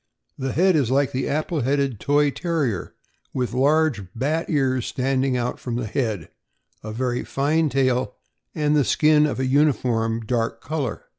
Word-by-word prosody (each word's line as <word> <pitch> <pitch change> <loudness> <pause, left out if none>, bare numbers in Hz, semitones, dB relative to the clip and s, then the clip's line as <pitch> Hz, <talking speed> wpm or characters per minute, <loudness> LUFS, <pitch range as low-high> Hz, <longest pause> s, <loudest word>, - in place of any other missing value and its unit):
The 135 -1 -3
head 185 +2 +3
is 140 -7 +2
like 135 +1 +2
the 130 - -2
apple 155 +1 -1
headed 135 -3 0
Toy 145 +2 +2
Terrier, 150 - -2 0.4
with 125 -2 -1
large 145 -2 +2
bat 155 +7 -1
ears 130 -5 +1
standing 130 0 0
out 125 0 -2
from 120 -2 -4
the 120 -1 -2
head, 110 - -2 0.5
a 110 - -6
very 125 +2 -2
fine 155 +3 +1
tail, 130 -2 0 0.4
and 150 -2 +1
the 145 - +4
skin 150 +3 +4
of 145 - -3
a 130 - 0
uniform 125 -5 +1
dark 115 -1 -1
color. 145 +1 -4
135 Hz, 160 wpm, -23 LUFS, 125-150 Hz, 0.5 s, the